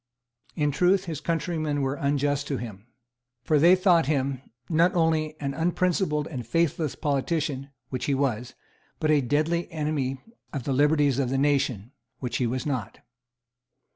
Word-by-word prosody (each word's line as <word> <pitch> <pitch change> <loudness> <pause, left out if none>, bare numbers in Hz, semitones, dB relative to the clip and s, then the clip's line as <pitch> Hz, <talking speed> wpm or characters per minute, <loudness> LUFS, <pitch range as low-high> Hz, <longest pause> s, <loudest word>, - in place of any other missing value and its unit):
In 150 -3 +1
truth, 185 +6 +2
his 160 -4 -5
countrymen 155 -3 -1
were 135 0 0
unjust 145 0 0
to 140 - -1
him. 110 -3 -8 0.6
For 150 +2 +3
they 175 +5 +7
thought 180 -5 +3
him, 135 -3 0 0.3
not 170 +2 +3
only 160 -2 +1
an 140 -1 -2
unprincipled 170 -2 0
and 130 -6 -5
faithless 155 +3 0
politician, 145 -1 -1 0.2
which 130 - -3
he 140 - +1
was, 125 -3 -1 0.4
but 155 - +2
a 150 -2 +4
deadly 155 +6 0
enemy 150 -4 -2 0.3
of 140 -4 -3
the 135 - -1
liberties 145 -1 +3
of 130 -3 0
the 135 - 0
nation, 135 -6 +1 0.3
which 125 -2 -3
he 125 - +1
was 125 +2 -3
not. 125 -8 -3
145 Hz, 155 wpm, -26 LUFS, 135-160 Hz, 0.6 s, they